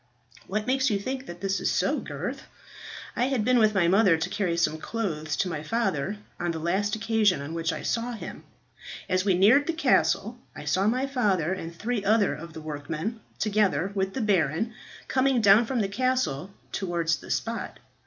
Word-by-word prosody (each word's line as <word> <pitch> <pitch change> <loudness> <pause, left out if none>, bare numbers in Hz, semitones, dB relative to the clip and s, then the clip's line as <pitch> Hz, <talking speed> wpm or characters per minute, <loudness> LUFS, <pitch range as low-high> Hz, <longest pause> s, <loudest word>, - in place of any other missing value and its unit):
"What 210 +2 -2
makes 265 +2 +2
you 205 - +1
think 260 +6 -4
that 175 0 -9
this 195 0 0
is - - 0
so, - - +1
Gurth?" - - -5 0.7
"I 245 - +2
had 255 -5 0
been 250 0 +4
with 215 -1 +4
my 180 -3 +4
mother 190 -2 +5
to 165 +3 -2
carry 180 -5 0
some 160 -2 +1
clothes 155 -7 -3
to 190 - +1
my 155 -4 -3
father 195 -1 -1 0.2
on 175 - -1
the 165 - -2
last 190 +6 0
occasion 220 -4 +2
on 145 +3 -6
which 165 0 -1
I - - -5
saw 235 +2 -1
him. 225 - -8 0.6
As 185 +1 +1
we 190 -3 +3
neared 230 +11 +5
the 335 - +1
castle 250 -6 +2 0.2
I 150 - -8
saw 185 +7 +2
my 255 +4 +1
father 200 - +1
and 165 -3 -5
three 220 +3 -2
other 210 -4 +3
of 160 +3 -9
the 160 - -8
workmen, 155 +8 -4 0.2
together 205 -3 +1
with 195 -1 -1
the 265 - -1
baron, 195 - +1 0.3
coming 265 -1 +2
down 215 +1 +6
from 250 -3 0
the 200 - 0
castle 205 - 0 0.2
towards 170 -3 0
the - - -13
spot. 230 0 -3
200 Hz, 195 wpm, -27 LUFS, 170-230 Hz, 0.7 s, down